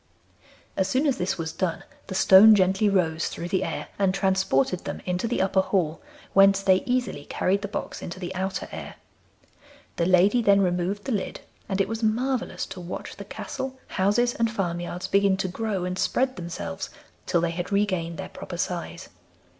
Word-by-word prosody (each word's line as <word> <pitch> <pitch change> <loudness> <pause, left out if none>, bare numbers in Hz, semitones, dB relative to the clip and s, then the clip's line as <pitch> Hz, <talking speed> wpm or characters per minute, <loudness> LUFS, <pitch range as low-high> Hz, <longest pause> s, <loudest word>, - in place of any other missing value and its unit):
As 190 - +1
soon 260 +8 +1
as 275 -3 +1
this 190 +2 -1
was 160 -1 -3
done 180 -4 -2 0.2
the 190 - -5
stone 200 +4 +8
gently 190 +2 +3
rose 165 -5 +1
through 170 - -5
the 190 0 +1
air - - -4
and 195 -1 +2
transported 190 -5 +1
them - - -5
into 180 +4 -1
the 230 -4 +1
upper 190 0 +2
hall, 170 -5 -1 0.3
whence 195 0 +5
they 190 -1 +5
easily 245 - -1
carried 195 +2 0
the 200 - -3
box 200 - -5
into 175 - -7
the 180 0 -5
outer 190 +1 -3
air. - - -7 1.0
The 170 - +1
lady 185 +6 +4
then 200 -3 +5
removed 180 +2 0
the 270 - -2
lid, 205 -4 -3 0.3
and 195 -1 -1
it 195 - +2
was 225 +2 -4
marvellous 240 +4 0
to 185 - -9
watch 175 +1 -7
the 200 - -8
castle, 265 +5 -6
houses, 210 +6 +2
and 230 0 +1
farmyards 175 -4 -3
begin 200 -1 +3
to 190 - -1
grow 195 -1 -2
and 180 +1 -3
spread 260 +1 +1
themselves 190 +2 -5 0.4
till 175 -2 +2
they 170 0 0
had 175 +3 -4
regained 185 -5 0
their - - -6
proper 175 - -8
size. 175 -1 -4
190 Hz, 185 wpm, -25 LUFS, 180-205 Hz, 1.0 s, stone